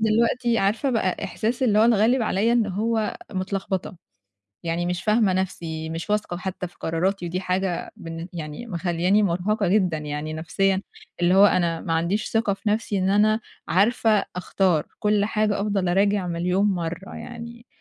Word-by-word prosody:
دلوقتي 230 Hz, +2 st, +2 dB
عارفة 215 Hz, +7 st, +1 dB
بقى 215 Hz, -7 st, 0 dB
إحساس 235 Hz, +4 st, -2 dB
اللي 215 Hz, -4 st, +3 dB
هو -, -, +6 dB
اتغلِّب 230 Hz, +2 st, +4 dB
عليّا 220 Hz, +2 st, +1 dB
إن 235 Hz, -3 st, +3 dB
هو 215 Hz, +3 st, -1 dB, 0.2 s
متلخبطة، 190 Hz, -1 st, -3 dB, 0.7 s
يعني 170 Hz, +1 st, -1 dB
مش 180 Hz, +1 st, -2 dB
فاهمة 215 Hz, -2 st, +3 dB
نَفْسي، 165 Hz, -4 st, -3 dB
مش 165 Hz, +5 st, -5 dB
واثقة 210 Hz, -4 st, 0 dB
وحتّى 180 Hz, +1 st, -4 dB
في -, -, -25 dB
قراراتي 175 Hz, +3 st, -1 dB
ودي 180 Hz, +2 st, -2 dB
حاجة 185 Hz, -1 st, -2 dB
بالن 165 Hz, +1 st, -7 dB
يعني 160 Hz, +5 st, -6 dB
مخلّياني 180 Hz, +1 st, +1 dB
مرهقة 195 Hz, +2 st, 0 dB
جدًا 180 Hz, -5 st, +2 dB
يعني 150 Hz, +1 st, -4 dB
نَفْسيًا، 190 Hz, +4 st, 0 dB, 0.4 s
اللي 175 Hz, +1 st, +4 dB
هو 195 Hz, +1 st, +8 dB
أنا 170 Hz, -4 st, +1 dB
ما 165 Hz, -, -3 dB
عنديش 170 Hz, +6 st, 0 dB
ثقة 225 Hz, -3 st, +1 dB
في 205 Hz, +2 st, -4 dB
نَفْسي 210 Hz, -2 st, 0 dB
إن 185 Hz, +1 st, +1 dB
أنا 215 Hz, +2 st, +3 dB, 0.3 s
عارفة 215 Hz, +1 st, +3 dB
أختار، 180 Hz, -3 st, +1 dB
كل 210 Hz, -1 st, +2 dB
حاجة 210 Hz, -1 st, 0 dB
أفضل 200 Hz, -3 st, 0 dB
أراجع 200 Hz, +1 st, +2 dB
مليون 180 Hz, +3 st, +1 dB
مرّة 175 Hz, -1 st, -3 dB
يعني، 235 Hz, 0 st, -9 dB
195 Hz, 160 wpm, -24 LUFS, 175-215 Hz, 0.7 s, هو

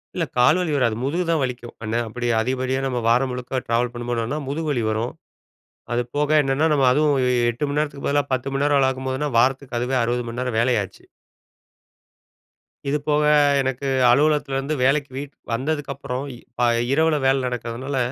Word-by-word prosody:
இல்ல. 170 Hz, -2 st, 0 dB
கால் 125 Hz, +8 st, +5 dB
வலி 170 Hz, -4 st, -1 dB
வராது, 120 Hz, -5 st, +1 dB
முதுகு 170 Hz, +7 st, -1 dB
தான் 160 Hz, -3 st, +2 dB
வலிக்கும், 125 Hz, -2 st, -4 dB
அன்நேரம் 115 Hz, +1 st, -1 dB
அப்டி 120 Hz, +2 st, -4 dB
அதிகபடியான 130 Hz, +2 st, -1 dB
நம்ம 125 Hz, -2 st, -2 dB
வாரம் 125 Hz, +3 st, +3 dB
முழுக்க 125 Hz, +1 st, -3 dB
ட்ராவல் 120 Hz, +1 st, +1 dB
பண்ணும்போதுன்னா, 120 Hz, +3 st, -3 dB
முதுகு 155 Hz, +2 st, -2 dB
வலி 120 Hz, -5 st, 0 dB
வரும். 110 Hz, +3 st, -2 dB, 0.8 s
அது 120 Hz, -, +1 dB
போக 150 Hz, 0 st, +1 dB
என்னன்னா, 140 Hz, +3 st, +1 dB
நம்ம 135 Hz, -3 st, +3 dB
அதுவும் 150 Hz, +1 st, +3 dB, 0.4 s
8 120 Hz, +6 st, -6 dB
மணி 145 Hz, -, -2 dB
நேரத்துக்கு 145 Hz, -2 st, -3 dB
பதிலா 145 Hz, 0 st, +2 dB
10 130 Hz, +1 st, -1 dB
மணி 135 Hz, +1 st, 0 dB
நேரம் 145 Hz, -1 st, +3 dB
வேலபார்க்கும்போதுனா, 130 Hz, +2 st, 0 dB
வாரத்துக்கு 130 Hz, -1 st, +1 dB
அதுவே 130 Hz, +2 st, 0 dB
60 120 Hz, +1 st, -1 dB
மணி 120 Hz, +2 st, -5 dB
நேரம் 125 Hz, -3 st, -2 dB
வேல 125 Hz, +1 st, +2 dB
ஆச்சு. 95 Hz, -, -13 dB, 1.8 s
இது 145 Hz, -, +1 dB
போக 150 Hz, 0 st, +2 dB, 0.4 s
எனக்கு 135 Hz, +1 st, -2 dB, 0.2 s
அலுவலகத்திலேருந்து 145 Hz, +1 st, +2 dB
வேலைக்கு 140 Hz, +1 st, +2 dB
வீட் 140 Hz, 0 st, -6 dB, 0.2 s
வந்ததுக்கப்புறம், 140 Hz, 0 st, -3 dB
இ -, -, -11 dB, 0.3 s
ஆ -, -, +5 dB, 0.3 s
இரவுல 160 Hz, 0 st, +3 dB
வேல 135 Hz, 0 st, +3 dB
நடக்கிறதுனால, 125 Hz, +3 st, -4 dB
130 Hz, 165 wpm, -22 LUFS, 125-145 Hz, 1.8 s, கால்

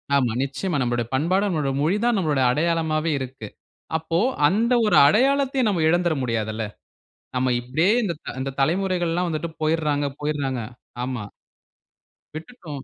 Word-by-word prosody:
ஆமா 130 Hz, -4 st, +2 dB
நிச்சயமா, 145 Hz, +5 st, -2 dB
நம்பளோட 120 Hz, -1 st, 0 dB
பண்பாடு, 170 Hz, +9 st, +2 dB
நம்பளோட 155 Hz, -7 st, -1 dB
மொழி 165 Hz, +7 st, +2 dB
தான், 240 Hz, -1 st, +3 dB
நம்பளோட 150 Hz, -7 st, +1 dB
அடையாளமாவே 160 Hz, +1 st, 0 dB
இருக்கு, 130 Hz, -4 st, -7 dB, 0.5 s
அப்போ 160 Hz, +1 st, -1 dB, 0.3 s
அந்த 225 Hz, +8 st, +2 dB
ஒரு 210 Hz, -, +4 dB
அடையாளத்தையும் 265 Hz, -, +2 dB
நம்ப 180 Hz, -5 st, 0 dB
இழந்துட 175 Hz, 0 st, +2 dB
முடியாதுல! 110 Hz, -2 st, -2 dB, 0.7 s
நம்ப 130 Hz, +1 st, +1 dB
இப்படியே 155 Hz, -, +1 dB
இந்தத்-இந்த 145 Hz, -, -4 dB
தலைமுறைகள் 175 Hz, +3 st, +1 dB
எல்லாம் 175 Hz, +1 st, 0 dB
வந்துட்டு 160 Hz, +1 st, -3 dB
போயிறாங்க 155 Hz, -2 st, +1 dB
போயிறாங்க, 145 Hz, -4 st, -2 dB, 0.4 s
ஆமா. 125 Hz, -4 st, -4 dB, 1.1 s
விட்டுட்டோம். 155 Hz, -, -8 dB
155 Hz, 125 wpm, -23 LUFS, 135-180 Hz, 1.1 s, ஒரு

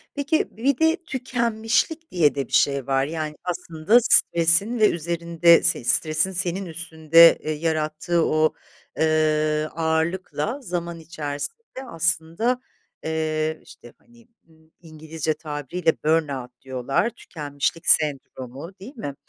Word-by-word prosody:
Peki, 310 Hz, +7 st, 0 dB
bir 260 Hz, +3 st, +1 dB
de 320 Hz, 0 st, +3 dB
tükenmişlik 250 Hz, +4 st, -2 dB
diye 160 Hz, -5 st, +2 dB
de 140 Hz, -3 st, -3 dB
bir -, -, -17 dB
şey 140 Hz, -3 st, +2 dB
var, 135 Hz, 0 st, +1 dB
yani, 155 Hz, 0 st, -5 dB
aslında 170 Hz, +3 st, 0 dB
stresin 170 Hz, +3 st, +4 dB
ve 215 Hz, -, +5 dB
üzerinde 170 Hz, 0 st, +2 dB
s -, -, +2 dB
stresin 155 Hz, +8 st, +1 dB
senin 185 Hz, +1 st, -1 dB
üstünde, 165 Hz, -1 st, +4 dB
eee, 155 Hz, -, -3 dB
yarattığı 155 Hz, +1 st, -1 dB
o, 155 Hz, 0 st, +1 dB, 0.4 s
eee, 155 Hz, -1 st, +1 dB
ağırlıkla 165 Hz, -, -2 dB
zaman 170 Hz, -6 st, -5 dB
içerisinde 165 Hz, -, -7 dB
aslında, 170 Hz, +7 st, 0 dB, 0.4 s
eee, 155 Hz, 0 st, -2 dB
işte, 120 Hz, -, -16 dB
hani, 235 Hz, -1 st, -23 dB, 0.2 s
ımm, 160 Hz, 0 st, -26 dB
İngilizce 160 Hz, -1 st, -5 dB
tabiriyle 155 Hz, +2 st, -2 dB
burn 160 Hz, 0 st, +2 dB
out 125 Hz, -3 st, -8 dB
diyorlar, 135 Hz, -, -1 dB
tükenmişlik 150 Hz, -5 st, -5 dB
sendromu, 140 Hz, 0 st, +2 dB
değil 240 Hz, +10 st, -11 dB
mi? 145 Hz, -, -6 dB
160 Hz, 120 wpm, -23 LUFS, 155-185 Hz, 0.4 s, ve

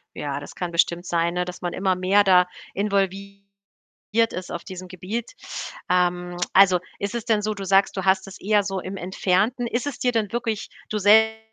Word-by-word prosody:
Ja, 140 Hz, -1 st, -3 dB
das 145 Hz, -, -11 dB
kann 175 Hz, -1 st, -4 dB
bestimmt 170 Hz, +1 st, +1 dB
sein, 170 Hz, -1 st, 0 dB
ne, 180 Hz, 0 st, 0 dB
dass 180 Hz, 0 st, -8 dB
man 175 Hz, -1 st, -3 dB
immer 190 Hz, -1 st, +1 dB
mehr 190 Hz, +3 st, +3 dB
da 180 Hz, -2 st, +5 dB, 0.3 s
involviert 200 Hz, 0 st, -1 dB, 0.9 s
ist 185 Hz, 0 st, -6 dB
auf 170 Hz, -, -5 dB
diesem 185 Hz, -1 st, -8 dB
Gebiet. 200 Hz, +6 st, -5 dB, 0.6 s
Ähm, 180 Hz, 0 st, +1 dB, 0.2 s
also, 185 Hz, -2 st, +6 dB, 0.2 s
ist 200 Hz, +3 st, -3 dB
es 235 Hz, -, -3 dB
denn 220 Hz, -3 st, +2 dB
so 215 Hz, +1 st, -1 dB
du 200 Hz, -1 st, -7 dB
sagst, 195 Hz, +1 st, +3 dB
du 190 Hz, -, -1 dB
hast 190 Hz, 0 st, +2 dB
es 195 Hz, -, -10 dB
eher 210 Hz, 0 st, +2 dB
so 195 Hz, -1 st, -3 dB
im 190 Hz, +1 st, -6 dB
Entfernten? 195 Hz, +6 st, 0 dB
Ist 240 Hz, +4 st, -2 dB
es 280 Hz, -, -5 dB
dir 250 Hz, -, +1 dB
denn 220 Hz, -4 st, -1 dB
wirklich, 230 Hz, -3 st, -2 dB, 0.2 s
du 215 Hz, -, -1 dB
selb 220 Hz, +2 st, +5 dB
195 Hz, 200 wpm, -23 LUFS, 180-210 Hz, 0.9 s, also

